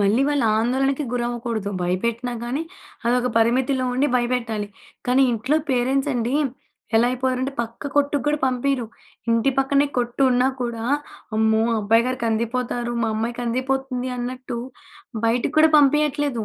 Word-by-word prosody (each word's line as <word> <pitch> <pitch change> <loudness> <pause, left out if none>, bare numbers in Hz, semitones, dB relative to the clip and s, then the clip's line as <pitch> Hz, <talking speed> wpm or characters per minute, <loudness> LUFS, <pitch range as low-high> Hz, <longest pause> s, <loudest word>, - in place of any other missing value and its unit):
మళ్ళీ 205 +6 +3
వాళ్ళు 290 -4 +1
ఆందోళనకు 270 +5 +1
గురవ్వకూడదు 240 -3 -2
భయపెట్టినా 235 +7 -1
గాని, 260 +6 -2 0.4
అదొక 250 +1 +2
పరిమితిలో 255 +3 +2
ఉండి 260 +3 +2
భయపెట్టాలి. 240 -4 -1 0.4
కానీ 255 +2 +4
ఇంట్లో 245 +7 +1
పేరెంట్సండి, 255 -1 0 0.6
ఎలా 235 - +4
అయిపోయారంటే 255 +1 -1
పక్క 230 +4 -5
కొట్టుక్కూడా 290 +1 +1
పంపియ్యరు. 255 -1 0 0.4
ఇంటి 230 +3 +3
పక్కనే 275 +1 +3
కొట్టున్నా 250 +1 +2
కూడా, 235 -2 -3 0.5
అమ్మో! 220 0 +3 0.2
అబ్బాయిగారు 230 +5 +2
కందిపోతారు, 235 +1 -1
మా 225 - +1
అమ్మాయి 230 +2 -2
కందిపోతుంది 255 +1 -2
అన్నట్టు, 250 0 -4 0.7
బయటికి 235 +6 0
కూడా 315 0 +6
పంపియట్లేదు. 290 -4 +2
245 Hz, 115 wpm, -22 LUFS, 235-270 Hz, 0.7 s, కూడా